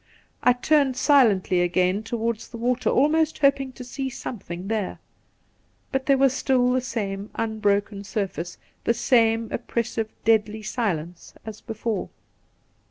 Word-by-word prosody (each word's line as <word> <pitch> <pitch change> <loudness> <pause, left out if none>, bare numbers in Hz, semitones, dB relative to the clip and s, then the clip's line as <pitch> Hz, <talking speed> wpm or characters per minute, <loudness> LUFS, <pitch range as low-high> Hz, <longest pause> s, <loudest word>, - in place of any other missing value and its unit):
I 250 - +5
turned 270 0 +2
silently 215 -11 +4
again 180 +3 +1
towards 225 0 -3
the 235 - -9
water, 245 +2 0
almost 310 +3 +2
hoping 275 -2 +2
to 250 - -9
see 265 +2 -4
something 190 -7 -7
there; 215 -3 -2 0.9
but 265 0 -2
there 275 -1 +5
was 270 -1 +4
stUl 250 -2 +2
the 255 - +1
same 205 -5 -4
unbroken 205 -2 0
surface, 195 -5 -4 0.3
the 235 - +2
same 230 -2 +3
oppressive 230 -2 -2 0.2
deadly 220 -1 +2
silence 180 -7 -3
as 220 -1 -8
before. 225 -1 -3
225 Hz, 130 wpm, -24 LUFS, 205-255 Hz, 0.9 s, I